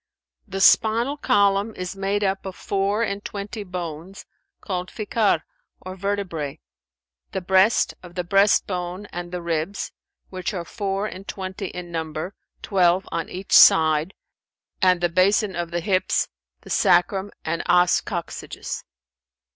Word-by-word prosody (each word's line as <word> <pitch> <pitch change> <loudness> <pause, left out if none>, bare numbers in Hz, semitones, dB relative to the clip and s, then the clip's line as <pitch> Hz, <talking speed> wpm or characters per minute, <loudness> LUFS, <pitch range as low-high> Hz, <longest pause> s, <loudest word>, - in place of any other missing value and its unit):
The 195 -1 -4
spinal 230 +8 +4
column 200 -4 +2
is 180 +1 -5
made 195 +1 -1
up 195 0 -1
of 190 - -6
four 200 +3 0
and 200 -2 -3
twenty 205 +1 -5
bones, 180 0 -7 0.3
called 180 -2 -4
Fikαr 215 0 +1 0.4
or 185 0 -8
vertebrζ; 190 -7 -3 0.8
the 190 - -2
breast, 190 +4 +3
of 175 -1 -13
the 180 - -1
breastbone 185 0 +1
and 175 0 -5
the 180 -1 -5
ribs, 170 +4 -2 0.4
which 185 +2 -3
are 175 -2 -4
four 195 +1 -2
and 195 -1 -7
twenty 190 0 -5
in 175 -1 -8
number, 160 +2 -4 0.3
twelve 185 -1 +2
on 165 - -3
each 185 +2 -8
side; 160 +3 +6 0.7
and 185 -2 +4
the 175 - +3
basin 190 +3 +2
of 170 -1 -3
the 175 0 -2
hips, 190 0 +1 0.3
the - - -11
sacrum[FN#397] 190 +3 +3 0.2
and 165 +1 -1
os 180 0 +4
coccygis. 175 -3 -5
190 Hz, 140 wpm, -23 LUFS, 175-200 Hz, 0.8 s, side